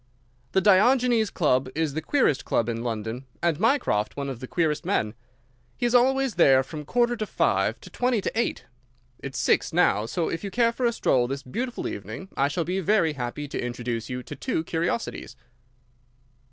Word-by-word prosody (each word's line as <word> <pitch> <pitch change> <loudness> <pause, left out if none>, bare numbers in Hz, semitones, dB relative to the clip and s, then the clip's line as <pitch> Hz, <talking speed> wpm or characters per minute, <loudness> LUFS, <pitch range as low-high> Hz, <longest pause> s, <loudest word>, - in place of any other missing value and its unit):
"The 190 - +4
Diogenes 225 +3 +4
Club 130 -8 +1
is 160 -2 0
the 160 - -2
queerest 255 - +1
club 115 - 0
in 115 -1 -2
London, 115 +2 -4 0.2
and 170 -3 +1
Mycroft 215 - +1
one 140 -1 -3
of 130 -4 -6
the 130 - -7
queerest 160 0 0
men. 165 - 0 0.6
He's 240 -1 0
always 265 0 +3
there 135 -3 +6
from 150 +2 -8
quarter 240 +7 +1
to 215 -2 -4
five - - +1
to - - -12
twenty 250 -2 +1
to - - -2
eight. 235 - -1 0.5
It's 135 -1 -6
six - - +2
now, 105 +2 +2
so 165 +6 -1
if 165 - -4
you 200 - -3
care 230 +4 +2
for 245 +1 0
a - - +2
stroll 125 - +2
this 135 +2 -4
beautiful 245 - -4
evening 190 - -7
I 140 - +2
shall 155 +4 -1
be 180 +3 -2
very 185 -4 +2
happy 135 +2 -4
to - - -3
introduce 120 -1 -4
you 125 0 -4
to - - -8
two 250 -11 -2
curiosities." 170 +8 -3
160 Hz, 185 wpm, -25 LUFS, -, 0.6 s, there